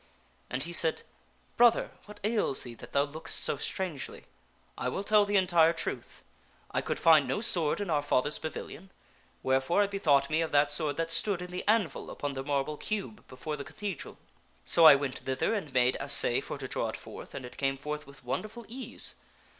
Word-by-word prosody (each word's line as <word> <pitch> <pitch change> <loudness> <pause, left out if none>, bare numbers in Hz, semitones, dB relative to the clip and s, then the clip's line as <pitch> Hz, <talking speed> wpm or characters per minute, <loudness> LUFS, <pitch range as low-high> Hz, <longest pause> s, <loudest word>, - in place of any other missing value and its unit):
And 130 +2 -1
he 170 +2 -5
said, 165 -2 +4 0.3
" - - -36
Brother, 240 -1 +4 0.2
what 210 0 -12
ails 210 - +1
thee 120 - -8
that 115 - -12
thou 140 - +3
lookest 150 +3 -4
so - - 0
strangely. 175 -8 -4 0.5
I 125 - -2
will 195 - -3
tell 210 0 +4
the 205 0 -1
entire 170 -3 +4
truth. - - -6 0.5
1 - - 0
could - - -3
find 155 -4 +5
no 135 - -1
sword 185 -9 +3
in 200 -4 -3
our 150 -2 +2
fathers 145 0 +1
pavilion, 165 +4 -7 0.5
wherefore 135 +9 +2
I - - +2
bethought 155 -9 +2
me 155 +2 +1
of 165 - -2
that 145 0 +4
sword 145 -1 +1
that 165 0 -2
stood 195 +2 0
in 180 - -9
the 180 - -4
anvil 215 -4 +1
upon 145 -1 -4
the 135 - -4
marble 145 +1 -1
cube 215 +2 -5
before 150 +4 -6
the 140 - -6
cathedral. 200 +3 -6 0.5
So 165 - +5
I 150 - +10
went 140 -2 -3
thither 130 - -1
and 195 -10 -3
made 125 0 +2
assay - - +3
for - - -6
to - - -6
draw - - -2
it - - -5
forth, - - -11
and 125 - -6
it 125 - -11
came 135 -1 0
forth 150 +1 -6
with 140 -2 -15
wonderful 215 - -4
ease. 255 +3 -3
155 Hz, 200 wpm, -29 LUFS, 140-195 Hz, 0.5 s, I